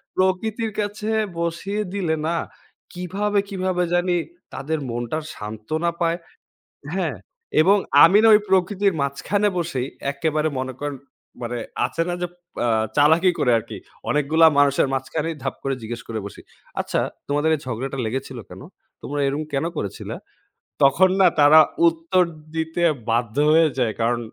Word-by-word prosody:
প্রকৃতির 215 +4 0
কাছে 210 +1 -3 0.3
বসিয়ে 170 +5 -2
দিলে 175 -5 0
না, 170 - 0 0.6
কিভাবে, 200 +3 -1
কিভাবে, 185 -2 -1
জানি 175 0 +2 0.4
তাদের 155 +2 -3
মনটা 120 +6 -3 0.2
সান্ত্বনা 110 +11 -3
পায়। 170 0 +1 0.8
হ্যাঁ। - - -1 0.4
এবং 195 +5 +5 0.3
আমি 190 +5 +6
না 225 - +6
ওই 210 - +6
প্রকৃতির 190 +1 +2
মাঝখানে 200 +9 0
বসেই 135 -7 -2 0.3
একেবারে 155 +2 0
মনে 130 0 -3
করেন 145 -1 -3 0.5
মানে 120 0 -3 0.3
আছে 165 - -2
না 175 - -1
যে - - +1 0.4
আ - - +1 0.3
চালাকি 160 +5 +5
করে 125 - +2
আরকি। - - -8 0.3
অনেকগুলা 155 +3 +4
মানুষের 140 -1 +4
মাঝখানেই 160 +4 -3
ধাপ 135 - -2
করে 135 0 -1
জিজ্ঞেস 115 +1 -5
করে 110 -1 -3
বসি। - - -10 0.4
আচ্ছা - - -1 0.3
"তোমাদের 145 +2 +1
এই 150 - -3
ঝগড়াটা 130 +3 -4
লেগেছিল 130 +1 -4
কেন? - - -10 0.4
তোমরা 145 +1 -3
এরকম 145 +3 -1
কেন 135 - 0
করেছিলা"? 100 - -5 0.7
তখন 165 +8 +5
না 185 - +7
তারা 150 +2 +8 0.3
উত্তর 325 - +1 0.3
দিতে 160 +2 -2 0.3
বাধ্য 115 0 0 0.2
হয়ে 160 0 +5
যায়। 115 -4 +1
কারণ 120 +1 +1
160 Hz, 145 wpm, -22 LUFS, 135-185 Hz, 0.8 s, তারা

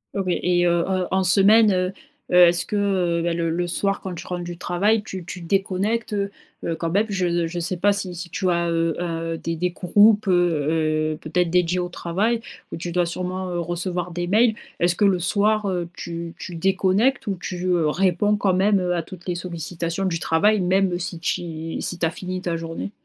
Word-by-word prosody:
Ok 195 - -1
et 175 0 +1
heu, 170 0 +2
en 185 -1 0
en 190 0 +1
semaine, 205 +4 +5
heu 185 0 0 0.4
heu, - - +2
est-ce 170 0 +1
que, - - -3
heu, 180 -4 +1
bah, 170 0 0
le 165 -1 -1
le 175 +2 -1
soir 195 +3 -1
quand 190 - -6
tu 170 - -8
rentres 180 -1 -4
du 175 0 -6
travail, 205 +6 +1
tu 185 -3 -7
tu 180 +1 -7
déconnectes, 195 +5 -1
heu 200 -1 -1 0.3
heu, 165 - -1
quand 165 0 -3
même? 205 +5 +2
Je 175 -3 0
je 175 +1 -4
sais 180 +1 -2
pas 205 +3 +3
si 190 -2 -4
si 175 +1 -7
tu 185 +2 -2
as, 170 0 +1
heu 165 -1 0
heu - - -1 0.3
heu, - - -4
des 165 0 -3
des 180 +2 -1
groupes, 205 +4 +4
heu 155 -3 +1
heu, - - -7
peut-être 175 +2 0
dédiés 180 0 +2
au 180 0 -2
travail 205 +7 -1 0.3
ou - - -4
tu 175 +1 -5
dois 175 0 +1
sûrement, 185 +2 -4
heu, 175 -1 -2
recevoir 175 +1 -3
des 175 +1 -3
mails. 220 +4 +4 0.3
Est-ce 175 +1 +3
que 205 - +2
le 195 -2 +4
soir, 205 +4 +1
heu, 175 -3 -2
tu 170 0 -6
tu 175 - -7
déconnectes 195 +9 +2
ou 200 -3 -1
tu, 180 0 -4
heu, 175 -4 +2
réponds 195 +5 +2
quand 195 -2 +1
même, 195 +2 +3
heu, 180 -1 0
à 170 - 0
toutes 175 +1 -12
les 180 - 0
sollicitations 170 +1 -4
du 165 -3 -1
travail 200 +7 +2
même 185 0 +2
si 175 -1 -5
ti 165 -1 -3
si 175 - -3
tu 170 - 0
as 160 - 0
fini 185 +2 -5
ta 175 -2 -2
journée? 165 +4 -5
180 Hz, 220 wpm, -23 LUFS, 170-195 Hz, 0.4 s, semaine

